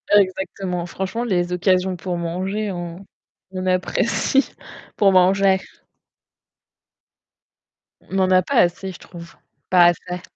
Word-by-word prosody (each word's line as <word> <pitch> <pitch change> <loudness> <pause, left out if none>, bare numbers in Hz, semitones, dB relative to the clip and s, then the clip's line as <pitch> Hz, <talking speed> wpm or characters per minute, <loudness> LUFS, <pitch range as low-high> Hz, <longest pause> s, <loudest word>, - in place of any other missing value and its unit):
Exactement. 185 -2 0
Franchement, 190 +6 -4
les 180 -5 -1
occasions 185 0 +1
pour 175 0 -4
manger, 190 +5 -3
on 175 +1 -7 0.5
on 185 0 -5
apprécie 200 +8 +1 0.5
pour 200 -2 +4
manger. 190 +1 +4 2.5
On 195 - -2
en 185 0 +2
a 185 - +5
pas 255 +10 -4
assez, 180 -1 +2
je - - -11
trouve, 170 -1 -12 0.3
pas 180 -2 +6
assez. 180 +1 -2
185 Hz, 115 wpm, -21 LUFS, 175-195 Hz, 2.5 s, pas